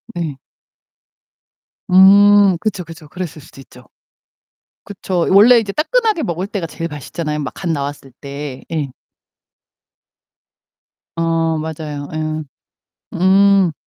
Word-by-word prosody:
네. 160 Hz, -6 st, -4 dB, 1.5 s
음. 200 Hz, 0 st, +6 dB
그쵸, 210 Hz, -4 st, -3 dB
그쵸. 165 Hz, -1 st, -13 dB
그랬을 165 Hz, -1 st, -7 dB
수도 135 Hz, -, -15 dB
있죠. 125 Hz, -1 st, -17 dB, 1.0 s
그쵸. 185 Hz, -3 st, -3 dB
원래 225 Hz, +5 st, +7 dB
이제 200 Hz, -3 st, -3 dB
따끈하게 435 Hz, -, 0 dB
먹을 175 Hz, -, -3 dB
때가 200 Hz, -5 st, -4 dB
제일 165 Hz, +1 st, -6 dB
맛있잖아요, 150 Hz, +1 st, -5 dB
막 140 Hz, -, -5 dB
갓 180 Hz, -, -5 dB
나왔을 140 Hz, -3 st, -4 dB
때. 140 Hz, -1 st, -7 dB
네. 150 Hz, -5 st, -3 dB, 2.2 s
아. 165 Hz, -1 st, 0 dB
맞아요. 155 Hz, -2 st, -6 dB
예. 155 Hz, 0 st, -3 dB, 0.7 s
음. 190 Hz, 0 st, +4 dB
165 Hz, 205 characters per minute, -17 LUFS, 150-195 Hz, 2.2 s, 원래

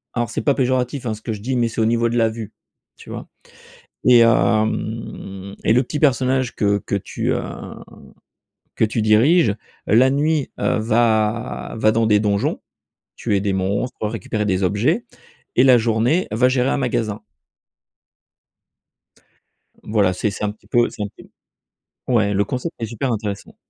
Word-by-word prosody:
alors 120 Hz, -2 st, -1 dB
c'est 115 Hz, -, -3 dB
pas 140 Hz, -, +2 dB
péjoratif 130 Hz, 0 st, 0 dB
hein, 110 Hz, -, -1 dB
ce 110 Hz, -, -9 dB
que 115 Hz, -, -4 dB
je 100 Hz, -, -8 dB
dis 130 Hz, +4 st, -2 dB
mais 120 Hz, -1 st, +2 dB
c'est 115 Hz, 0 st, -3 dB
au -, -, +3 dB
niveau 115 Hz, +1 st, +2 dB
de 120 Hz, -, -1 dB
la 115 Hz, -1 st, +3 dB
vue, 110 Hz, -1 st, -7 dB, 0.4 s
tu -, -, -15 dB
vois? -, -, -7 dB, 0.8 s
Et 125 Hz, -1 st, +7 dB
hem 110 Hz, -3 st, 0 dB
et -, -, +3 dB
le 125 Hz, +3 st, +3 dB
petit 150 Hz, +4 st, -4 dB
personnage 130 Hz, -3 st, +1 dB
que 100 Hz, -1 st, +2 dB
que -, -, -1 dB
tu 100 Hz, -, -2 dB
heu, -, -, -2 dB, 1.3 s
que -, -, +3 dB
tu 110 Hz, +1 st, -2 dB
diriges 110 Hz, -, +4 dB, 0.3 s
la 125 Hz, +5 st, +5 dB
nuit 145 Hz, +1 st, 0 dB
heu, -, -, +1 dB
va 110 Hz, 0 st, 0 dB
va 110 Hz, 0 st, +3 dB
dans 115 Hz, 0 st, +1 dB
des 105 Hz, -1 st, +4 dB
donjons, 100 Hz, -1 st, 0 dB, 0.5 s
tuer 105 Hz, -4 st, 0 dB
des 100 Hz, 0 st, -1 dB
monstres, 100 Hz, +5 st, -2 dB
récupérer 105 Hz, -1 st, -3 dB
des 95 Hz, -1 st, 0 dB
objets 120 Hz, -, +1 dB, 0.5 s
et 125 Hz, -, +5 dB
la 130 Hz, -2 st, +7 dB
journée 115 Hz, +9 st, +1 dB
va 125 Hz, +4 st, +3 dB
gérer 130 Hz, 0 st, +1 dB
un -, -, 0 dB
magasin. 115 Hz, -5 st, -2 dB, 2.6 s
Voilà, 105 Hz, -4 st, +1 dB
c'est 100 Hz, +4 st, -1 dB
c'est 100 Hz, +1 st, -6 dB
un 105 Hz, -, 0 dB
petit 105 Hz, -, -20 dB
peu 120 Hz, 0 st, +3 dB
c'est -, -, -8 dB
un 105 Hz, -, -1 dB
petit -, -, -16 dB, 0.6 s
peu 130 Hz, -, -7 dB
ouais 105 Hz, -3 st, +2 dB
le 100 Hz, +1 st, +1 dB
concept 130 Hz, +9 st, -4 dB
est 115 Hz, -, -2 dB
super 115 Hz, +4 st, -3 dB
intéressant. 105 Hz, -3 st, -4 dB
115 Hz, 170 wpm, -20 LUFS, 105-125 Hz, 2.6 s, Et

